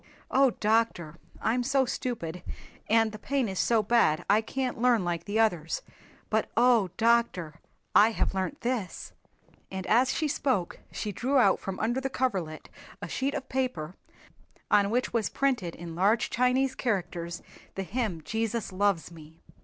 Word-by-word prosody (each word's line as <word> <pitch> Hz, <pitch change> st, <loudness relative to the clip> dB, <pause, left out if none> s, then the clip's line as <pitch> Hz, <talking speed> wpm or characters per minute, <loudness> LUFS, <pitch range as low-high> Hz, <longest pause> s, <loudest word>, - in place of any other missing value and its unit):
"Oh, 270 Hz, 0 st, +5 dB
doctor, 210 Hz, -7 st, +1 dB, 0.3 s
I'm 240 Hz, +3 st, +2 dB
so 270 Hz, +2 st, +2 dB
stupid, 195 Hz, -10 st, -4 dB, 0.5 s
and 225 Hz, 0 st, +4 dB
the 215 Hz, -, -9 dB
pain 270 Hz, +1 st, 0 dB
is 190 Hz, -2 st, -4 dB
so 225 Hz, -2 st, +3 dB
bad 205 Hz, -8 st, +3 dB
I 210 Hz, +2 st, +4 dB
can't 250 Hz, +1 st, -3 dB
learn 240 Hz, -6 st, +3 dB
like 170 Hz, -1 st, -2 dB
the 210 Hz, +2 st, -1 dB
others. 175 Hz, -8 st, +1 dB, 0.5 s
But 220 Hz, 0 st, +1 dB
oh, 235 Hz, -5 st, +4 dB
doctor, 225 Hz, -9 st, +1 dB, 0.3 s
I 215 Hz, -, +7 dB
have 225 Hz, -, -1 dB
learnt 190 Hz, +9 st, -3 dB
this," 235 Hz, -6 st, -3 dB, 0.6 s
and 190 Hz, -1 st, -5 dB
as 250 Hz, +4 st, +3 dB
she 315 Hz, -, 0 dB
spoke 255 Hz, -11 st, -1 dB
she 210 Hz, -, -4 dB
drew 260 Hz, +8 st, 0 dB
out 200 Hz, -7 st, +4 dB
from 195 Hz, -1 st, -5 dB
under 240 Hz, +4 st, 0 dB
the 270 Hz, -, -2 dB
coverlet 190 Hz, -13 st, -2 dB, 0.3 s
a -, -, -6 dB
sheet 275 Hz, +1 st, -2 dB
of 265 Hz, -, -4 dB
paper 220 Hz, -11 st, -2 dB, 0.8 s
on 205 Hz, -1 st, +4 dB
which 245 Hz, +3 st, 0 dB
was 230 Hz, -3 st, +1 dB
printed 245 Hz, -11 st, 0 dB
in 170 Hz, 0 st, -8 dB
large 200 Hz, +7 st, +2 dB
Chinese 255 Hz, +2 st, +2 dB
characters 175 Hz, -8 st, -3 dB, 0.3 s
the 195 Hz, -, -2 dB
hymn 200 Hz, -6 st, -3 dB
"Jesus 225 Hz, -1 st, -2 dB
Loves 185 Hz, -3 st, 0 dB
Me." 160 Hz, -1 st, -14 dB
220 Hz, 160 wpm, -28 LUFS, 180-250 Hz, 0.8 s, I